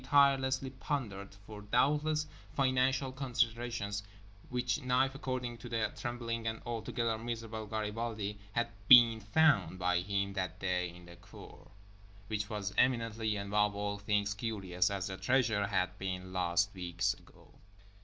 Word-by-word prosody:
tirelessly 135 -1 +3
pandered, 110 -8 -4
for, 105 -1 -9
doubtless, 150 +8 +2 0.3
financial 130 0 +2
considerations—which 115 -2 -2
knife 130 +1 +2
according 130 -3 -4
to 120 - -8
the 115 -2 0
trembling 115 -2 -3
and 110 0 -2
altogether 115 -1 -2
miserable 115 -2 -5
Garibaldi 110 -1 -3
had 120 +1 +1 0.2
"been 120 -3 +9
found" 110 -1 +3
by 90 -1 +2
him 100 +1 -1
that 95 -1 -3
day 90 -2 0
in 90 0 -13
the 85 0 -13
cour; 90 - -14 0.6
which 105 0 -3
was 100 -3 -3
eminently 115 -3 +1
and 100 -1 -4
above 105 0 +2
all 100 0 -2
things 105 0 0
curious, 95 -5 -1
as 100 -2 -2
the 95 0 -5
treasure 110 -6 +2
had 95 -2 0
been 95 -1 -4
lost 90 +1 +1
weeks 85 -2 -1
before. - - -20
110 Hz, 135 wpm, -33 LUFS, 100-125 Hz, 0.6 s, been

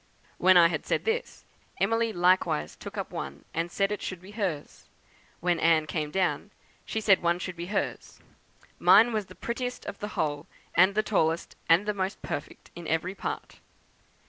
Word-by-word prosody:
When 185 0 +6
I 170 -1 +8
had 155 -3 -3
said - - 0
this, 450 +2 -2 0.3
Emily 225 +3 +2
likewise 175 - +2
took - - -9
up - - -4
one 70 +1 -6
and 165 +1 -1
said 195 +3 0
it 210 - -3
should 185 - -5
be 190 +3 -13
hers; 190 -9 -4 0.6
when 175 -1 +1
Anne 165 -2 +4
came 155 -1 -3
down, 185 +3 0 0.4
she 220 - -2
said 205 -3 +4
one 170 0 +2
should 180 0 -5
be 170 +1 -6
hers. 205 +1 -3 0.6
Mine 235 +2 +6
was 210 -3 -1
the - - -13
prettiest 250 +1 -4
of 200 - -6
the 210 - -4
whole, 145 -1 -1 0.3
and 185 +3 +5
the 215 - +2
tallest, 165 -6 0
and 170 +5 +5
the 210 - 0
most 190 0 -3
perfect - - -6
in 170 -1 -8
every 165 +4 0
part. - - -6
185 Hz, 180 wpm, -28 LUFS, 165-210 Hz, 0.6 s, I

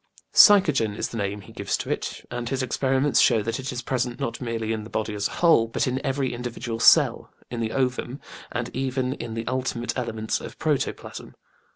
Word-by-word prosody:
Psychogen 150 - +6
is - - -2
the 115 - -6
name 100 0 -2
he - - -14
gives - - -2
to - - -5
it, - - -4
and 120 -1 -4
his 135 -1 -1
experiments 135 +2 +1
show 115 -4 +4
that 115 +5 -2
it 135 +2 -4
is 125 -1 -5
present 125 0 -2
not 135 -3 -3
merely 115 -2 -2
in 110 -1 -4
the 110 - -10
body 110 -1 -2
as 100 -1 -1
a - - -12
whole, 115 -9 +5
but 115 - -1
in 130 +1 -2
every 135 -1 -1
individual 120 -1 -5
cell, - - +5 0.2
in 120 - -4
the 110 -1 -1
ovum, 130 +1 -1 0.3
and 120 -1 -4
even 130 -1 -1
in 115 -4 -6
the 115 0 -4
ultimate 125 -2 -2
elements 110 -3 -2
of - - -9
protoplasm. 150 -4 -3
120 Hz, 205 wpm, -25 LUFS, 115-130 Hz, 0.3 s, Psychogen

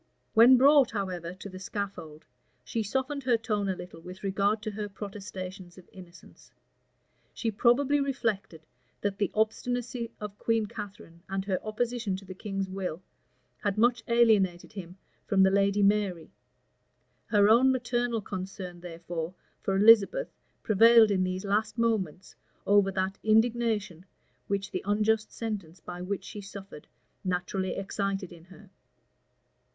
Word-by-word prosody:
When 240 +3 +8
brought, 275 0 +6
however, 180 -4 -4
to 190 - -9
the 185 -1 -9
scaffold, 185 -6 -6 0.4
she 225 - -2
softened 265 +6 -2
her 245 -3 +4
tone 210 -3 -1
a 190 - 0
little 175 -2 -10
with 180 +3 -11
regard 200 +2 0
to 215 - -3
her 205 0 -5
protestations 190 -3 -8
of 185 - -15
innocence. 180 -2 -15 0.8
She 225 - -1
probably 260 +7 +3
reflected, 220 - -2 0.4
that 200 -1 -2
the 205 - +1
obstinacy 235 +2 -1
of 205 -1 -7
Queen 225 -1 +1
Catharine, 205 -6 -9
and 195 0 -2
her 190 -2 -2
opposition 230 -1 -2
to 195 +1 -9
the 185 - -8
king's 195 0 -4
will, 185 -2 -5 0.6
had 205 0 -1
much 240 +1 +3
alienated 215 -7 +3
him 185 -2 -8 0.3
from 195 -1 +4
the 190 - +5
lady 200 +1 +2
Mary: 200 -5 +1 1.0
her 205 -2 +4
own 245 +5 +6
maternal 240 -2 -1
concern, 185 -2 -6
therefore, 170 0 -6 0.3
for 195 - -1
Elizabeth 220 - +5 0.3
prevailed 225 +1 +6
in 185 -2 +2
these 185 +2 -3
last 210 +3 0
moments 195 -7 -1 0.3
over 200 -1 +4
that 190 +1 -2
indignation 220 -5 +1 0.4
which 200 0 -2
the - - -3
unjust 215 +2 +1
sentence 200 -7 -5
by 175 +2 -8
which 195 +2 -3
she 210 - -8
suffered 195 -5 -10 0.4
naturally 185 +1 -2
excited 195 -1 -3
in 170 -1 -15
her. 195 +1 -16
200 Hz, 140 wpm, -28 LUFS, 185-225 Hz, 1.0 s, When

